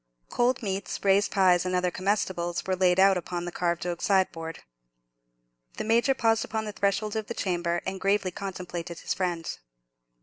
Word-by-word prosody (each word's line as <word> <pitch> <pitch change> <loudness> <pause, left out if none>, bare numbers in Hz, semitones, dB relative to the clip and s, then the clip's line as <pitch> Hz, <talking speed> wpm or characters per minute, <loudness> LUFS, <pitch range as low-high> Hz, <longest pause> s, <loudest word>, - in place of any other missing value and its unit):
Cold 245 +1 +1
meats, 195 -1 -3
raised 200 +1 +4
pies, 185 -3 +4
and 185 0 -1
other 180 0 +1
comestibles 185 -2 -1
were 190 - 0
laid 185 0 +3
out 195 0 +6
upon 175 0 -4
the 175 - -4
carved 170 0 -1
oak 175 -1 -3
sideboard. 185 -5 0 1.1
The - - -2
Major 235 +5 +3
paused 225 -3 +2
upon 220 0 -3
the 210 - -4
threshold 200 +2 0
of 220 -1 -2
the 235 - -5
chamber 175 -2 -1
and 190 0 -4
gravely 195 -1 +1
contemplated 180 -3 -6
his - - -1
friend. 175 -3 -2
190 Hz, 170 wpm, -27 LUFS, 175-205 Hz, 1.1 s, out